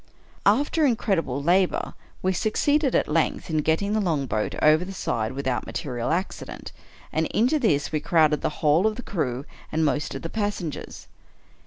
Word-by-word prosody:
After 285 +9 +3
incredible 190 - +1
labor 180 +3 +2 0.3
we 185 0 +2
succeeded, 275 - +1
at - - +2
length, 160 +1 0
in 155 - +1
getting 160 +7 +1
the 215 - +2
longboat 140 - -1
over 155 +2 +5
the 195 +2 -7
side 110 -7 -2
without 130 -2 -2
material 125 -7 -3
accident, 180 +5 -3 0.4
and - - +1
into 250 +8 +2
this 150 - +1
we 155 - 0
crowded 155 -1 +3
the - - 0 0.2
whole 160 +8 +5
of 215 - -1
the 250 - -7
crew 135 -7 -2 0.3
and 160 0 +1
most 150 0 -1
of - - -6
the 165 - -4
passengers. 205 -8 -4
165 Hz, 165 wpm, -25 LUFS, 145-205 Hz, 0.4 s, over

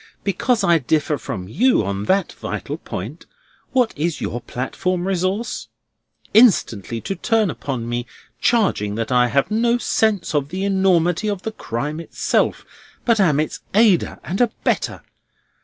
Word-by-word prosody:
Because 205 +3 +1
I 170 -3 +4
differ 150 +2 0
from 100 -10 -5
you 205 - +2
on 100 +1 -3
that 195 - +1
vital - - -5
point, - - -7 0.4
what 250 -4 +2
is 160 +2 -1
your 120 - -3
platform 175 +10 -2
resource? 195 +4 -1 0.7
Instantly 120 - +4
to - - -3
turn 215 +1 +1
upon 130 -5 -4
me, 120 +1 -3 0.3
charging 190 - +1
that 115 +2 -3
I 125 -1 +4
have 140 - +1
no 235 +2 +2
sense 220 -6 0
of 145 -2 0
the 185 +3 -3
enormity 190 -1 +2
of 200 -3 -2
the 220 - -3
crime 145 - -4
itself, 165 - 0 0.4
but 230 -2 +3
am 155 -7 +3
its 155 - -2 0.2
aider 210 -5 +4
and 190 +7 -2
abettor! 240 -2 0
175 Hz, 145 wpm, -21 LUFS, 135-210 Hz, 0.7 s, I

